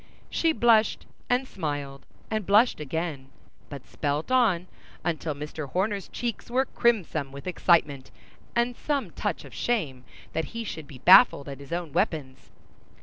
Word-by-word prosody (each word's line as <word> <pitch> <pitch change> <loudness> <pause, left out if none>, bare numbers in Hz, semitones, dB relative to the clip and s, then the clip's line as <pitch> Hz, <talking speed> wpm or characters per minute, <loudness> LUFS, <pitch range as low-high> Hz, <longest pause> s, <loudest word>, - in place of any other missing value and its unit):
She 330 - +2
blushed, 230 -7 +3 0.2
and 250 +2 +1
smiled, 145 - -5 0.2
and 215 -1 0
blushed 210 +2 +4
again, 150 -2 -4 0.4
but 140 -3 -9
spelt 150 - -3
on, 220 -9 +3 0.4
until 160 -3 -2
Mr. 150 0 -6
Horner's 195 +5 -1
cheeks 240 -1 -4
were 260 +2 +2
crimson 180 - 0
with 140 0 -10
excitement 160 -7 +2 0.5
and 240 +1 +1
some 275 - -2
touch 200 -5 -3
of 135 - -13
shame 140 - -1 0.3
that 160 - -1
he 230 - -2
should 160 -8 -7
be 135 - -11
baffled 185 - +7
at 140 -1 -7
his 140 +2 -12
own 170 -4 -3
weapons. 150 -9 -2
170 Hz, 145 wpm, -26 LUFS, 145-225 Hz, 0.5 s, baffled